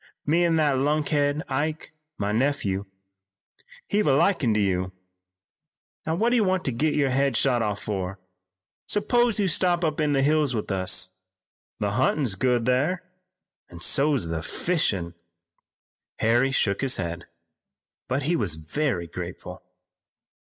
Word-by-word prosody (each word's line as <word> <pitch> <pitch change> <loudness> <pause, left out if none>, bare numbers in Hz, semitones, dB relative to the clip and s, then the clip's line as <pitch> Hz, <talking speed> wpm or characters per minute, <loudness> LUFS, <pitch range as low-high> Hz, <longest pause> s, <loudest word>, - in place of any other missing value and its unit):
Me 165 +4 +3
an' 170 -1 +2
that 145 -4 +2
lunkhead 145 +1 +1
Ike, 150 +4 -3 0.2
my 100 0 -1
nephew, 105 -5 0 1.1
hev 210 +1 +2
took 145 - +4
a 135 - +4
likin' 150 - +2
to - - +2
you. 95 -2 0 1.1
Now, 160 - +1
what 230 +7 +1
do - - +3
you 225 - +3
want 185 -2 0
to 130 - +1
git 150 +6 0
your 140 -3 +2
head 135 +1 +1
shot 125 -3 +3
off 105 -2 -2
fur? 95 -2 -3 0.7
S'pose 235 +2 +2
you 200 - +2
stop 175 0 +2
up 155 -2 -1
in 150 -2 +1
the 135 -1 +2
hills 150 -3 +2
with 105 -1 -3
us. 95 -1 0 0.7
The 100 -1 -1
huntin's 130 +1 +1
good 120 +2 +1
thar, 145 +9 +1 0.7
an' 85 -1 -12
so's 135 - +2
the 80 -1 -2
fishin'." 100 - -1 1.0
Harry 120 +4 +2
shook 100 -7 0
his 135 -1 +1
head, 85 -1 -4 0.8
but 130 +2 -1
he 165 +5 +1
was 100 - 0
very 85 - -2
grateful. 90 +1 -8
135 Hz, 150 wpm, -25 LUFS, 100-155 Hz, 1.1 s, took